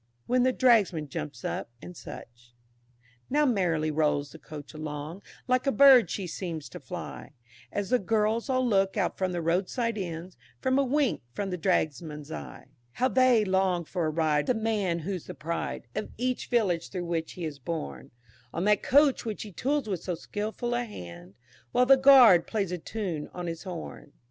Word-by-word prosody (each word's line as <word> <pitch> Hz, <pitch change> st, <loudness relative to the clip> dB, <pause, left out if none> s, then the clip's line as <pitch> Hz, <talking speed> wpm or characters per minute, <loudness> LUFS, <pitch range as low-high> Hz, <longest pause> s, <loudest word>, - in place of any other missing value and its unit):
When 250 Hz, 0 st, +2 dB
the 255 Hz, +1 st, +4 dB
Dragsman 205 Hz, -, +3 dB
jumps 75 Hz, -, -6 dB
up, -, -, -3 dB, 0.2 s
&c. -, -, -9 dB, 1.2 s
Now 295 Hz, +3 st, +3 dB
merrily 170 Hz, -, +1 dB
rolls 150 Hz, -2 st, 0 dB
the 160 Hz, -, -12 dB
Coach 150 Hz, -3 st, -10 dB
along, 155 Hz, +3 st, -6 dB, 0.3 s
Like 255 Hz, +2 st, +1 dB
a -, -, +4 dB
bird 270 Hz, -4 st, +7 dB
she 195 Hz, -, -3 dB
seems 170 Hz, -4 st, -5 dB
to -, -, -9 dB
fly, -, -, -8 dB, 0.4 s
As 205 Hz, +1 st, -3 dB
the 250 Hz, -, +4 dB
girls 220 Hz, +5 st, 0 dB
all 255 Hz, -1 st, +2 dB
look 195 Hz, -2 st, +2 dB
out 190 Hz, -, 0 dB
from 185 Hz, -1 st, -1 dB
the 175 Hz, -2 st, -3 dB
roadside 205 Hz, +7 st, 0 dB
Inns, 175 Hz, 0 st, -6 dB, 0.2 s
For -, -, -1 dB
a 275 Hz, +2 st, +4 dB
wink 275 Hz, 0 st, +1 dB
from 195 Hz, +4 st, -3 dB
the 180 Hz, -, -2 dB
Dragsman's 155 Hz, -3 st, -1 dB
eye, 70 Hz, -, -8 dB, 0.3 s
How 255 Hz, +2 st, +1 dB
they 255 Hz, -5 st, +4 dB
long 190 Hz, -2 st, +1 dB
for 170 Hz, 0 st, -2 dB
a -, -, +1 dB
ride 155 Hz, -2 st, +1 dB
with 250 Hz, -, +2 dB
the 220 Hz, -, -5 dB
man 205 Hz, -6 st, 0 dB
who's 180 Hz, +1 st, -4 dB
the -, -, -7 dB
pride 165 Hz, -4 st, -4 dB
Of -, -, -4 dB
each 250 Hz, +2 st, -2 dB
village 190 Hz, -8 st, +1 dB
through 180 Hz, -2 st, -4 dB
which 165 Hz, -1 st, -2 dB
he 175 Hz, -, -5 dB
is 150 Hz, -3 st, -6 dB
borne, 70 Hz, -, -5 dB, 0.5 s
On 170 Hz, -, -1 dB
that 210 Hz, +1 st, +3 dB
Coach 285 Hz, 0 st, +4 dB
which 220 Hz, -3 st, -4 dB
he 210 Hz, -, -9 dB
tools 275 Hz, +6 st, -1 dB
with 190 Hz, -5 st, -2 dB
so 180 Hz, -, -3 dB
skilful 220 Hz, +7 st, -4 dB
a 240 Hz, 0 st, 0 dB
hand, 90 Hz, -, -10 dB, 0.4 s
While 250 Hz, -, +4 dB
the 270 Hz, +1 st, +8 dB
Guard 260 Hz, -10 st, +7 dB
plays 200 Hz, -5 st, -1 dB
a 180 Hz, -, -3 dB
tune 175 Hz, -6 st, -4 dB
on 180 Hz, -, -4 dB
his 165 Hz, -1 st, -4 dB
horn. 170 Hz, -5 st, -8 dB
190 Hz, 190 wpm, -28 LUFS, 160-235 Hz, 1.2 s, the